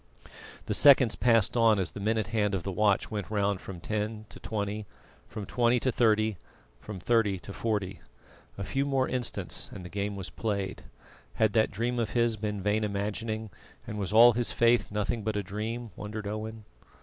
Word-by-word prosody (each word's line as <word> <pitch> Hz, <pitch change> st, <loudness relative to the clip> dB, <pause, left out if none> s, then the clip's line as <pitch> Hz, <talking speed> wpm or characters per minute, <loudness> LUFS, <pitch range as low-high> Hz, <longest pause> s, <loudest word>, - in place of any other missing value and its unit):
The -, -, -1 dB
seconds 130 Hz, -5 st, +6 dB
passed 115 Hz, -3 st, +3 dB
on 115 Hz, -3 st, +5 dB
as 95 Hz, -4 st, -1 dB
the -, -, -8 dB
minute 110 Hz, +1 st, 0 dB
hand 105 Hz, -2 st, +1 dB
of 90 Hz, -, -3 dB
the 95 Hz, -, -3 dB
watch 100 Hz, +1 st, +2 dB
went 100 Hz, -4 st, -4 dB
round 100 Hz, -2 st, 0 dB
from 95 Hz, -3 st, -8 dB
ten 110 Hz, +3 st, -3 dB
to -, -, -11 dB
twenty, 105 Hz, -1 st, -3 dB, 0.4 s
from 105 Hz, -2 st, -6 dB
twenty 120 Hz, +3 st, +2 dB
to 130 Hz, -, +1 dB
thirty, 110 Hz, -3 st, +2 dB, 0.4 s
from 105 Hz, -3 st, -8 dB
thirty 105 Hz, -1 st, +2 dB
to 100 Hz, +2 st, -9 dB
forty. 100 Hz, -4 st, -2 dB, 0.6 s
A 100 Hz, -, -3 dB
few 135 Hz, +8 st, -1 dB
more 135 Hz, -2 st, +1 dB
instants 125 Hz, -2 st, -3 dB
and 95 Hz, -, -9 dB
the -, -, -7 dB
game 100 Hz, +2 st, -3 dB
was 95 Hz, -1 st, -6 dB
played. 100 Hz, -4 st, -3 dB, 0.5 s
Had 110 Hz, -2 st, +2 dB
that 110 Hz, +1 st, +3 dB
dream 120 Hz, +3 st, -2 dB
of 115 Hz, -1 st, -2 dB
his 120 Hz, -1 st, +2 dB
been 105 Hz, -2 st, -4 dB
vain 105 Hz, +2 st, +1 dB
imagining, 105 Hz, +1 st, -3 dB, 0.3 s
and 105 Hz, -, -5 dB
was 95 Hz, -2 st, -3 dB
all 115 Hz, +2 st, +8 dB
his 120 Hz, +1 st, 0 dB
faith 120 Hz, 0 st, +3 dB
nothing 105 Hz, +2 st, -2 dB
but 110 Hz, 0 st, -2 dB
a 105 Hz, -, -1 dB
dream 110 Hz, +4 st, -4 dB
wondered 105 Hz, 0 st, -6 dB
Owen? 110 Hz, +1 st, -5 dB
105 Hz, 185 wpm, -29 LUFS, 100-115 Hz, 0.6 s, all